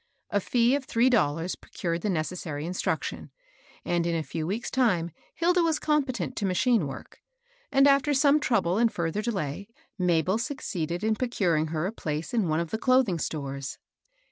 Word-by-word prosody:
A 205 - +2
fee 240 +4 +2
of 280 -1 0
three 245 +2 +3
dollars 165 -5 +1
procured 170 -1 -4
the 210 - -1
necessary 155 -3 -3
instruction, 180 +2 -3 0.6
and, 170 -1 0
in 170 - 0
a 160 - -1
few 160 0 -4
weeks' 220 +6 -3
time 180 -10 +1 0.2
Hilda 350 +2 +3
was 325 -2 +2
competent 260 - -1
to 205 - -1
machine 190 - +2
work; 135 - -10 0.5
and 275 +1 +5
after 280 +1 +4
some 285 +2 +5
trou 250 -5 +2
ble 175 +5 0
and 230 -1 +3
further 170 +4 -2
delay, 200 -5 -3 0.3
Mabel 180 +3 +2
succeeded 185 - -3
in 220 0 +2
procur 210 -8 0
ing 155 +1 +1
her 155 +1 -2
a 195 - -1
place 155 -5 -4
in 220 -6 +2
one 155 0 +1
of 170 -1 -3
the 220 - -2
clothing 255 -9 +3
stores. 140 -3 -4
190 Hz, 180 wpm, -27 LUFS, 165-245 Hz, 0.6 s, and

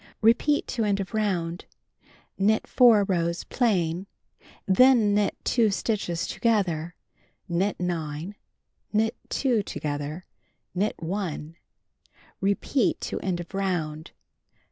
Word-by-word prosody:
Repeat 235 +6 +3
to 235 -3 -1
end 200 -2 +1
of 195 +3 -5
round. 180 -6 -1 0.7
Knit 215 +3 +2
4 235 -5 +6
rows 170 -3 -1
plain. 185 -6 0 0.6
Then 220 +1 +5
knit 205 0 +1
2 230 -3 +3
stitches 195 -4 -1
together, 175 -7 0 0.5
knit 185 +4 0
9, 165 0 -3 0.6
knit 225 +2 +1
2 245 -6 +1
together, 150 -1 -4 0.5
knit 200 +4 0
1. 165 -3 -4 0.9
Repeat 200 +5 +1
to - - -3
end 180 -2 -2
of 175 +2 -8
round. 165 -6 -2
195 Hz, 105 wpm, -26 LUFS, 170-215 Hz, 0.9 s, 4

